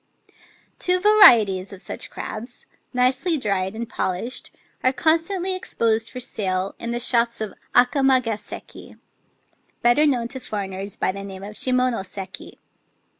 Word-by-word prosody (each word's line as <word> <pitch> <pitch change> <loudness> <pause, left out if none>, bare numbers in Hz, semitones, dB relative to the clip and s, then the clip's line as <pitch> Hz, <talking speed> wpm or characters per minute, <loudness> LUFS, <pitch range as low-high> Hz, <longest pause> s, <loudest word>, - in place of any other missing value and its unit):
Two 365 0 +2
varieties 225 - +6
of 195 - -10
such - - -4
crabs 235 +3 -7
— - - -46
nicely 255 +7 +2
dried 195 -5 -1
and 230 +1 -4
polished 190 +8 -3 0.2
— - - -38
are 255 - +4
constantly 335 +7 +1
exposed 225 -10 0
for 255 - -7
sale 190 -5 -2
in 235 - -5
the 240 0 -2
shops 235 -1 +2
of 215 -3 -4 0.2
Akamagaseki 250 -5 +1 0.9
(better 240 +6 +5
known 245 -5 +1
to 265 - -4
foreigners 195 -3 -5
by - - 0
the 195 +1 -7
name 195 -1 -8
of 205 +1 -8
Shimonoseki). 210 -7 -1
235 Hz, 135 wpm, -22 LUFS, 200-260 Hz, 0.9 s, varieties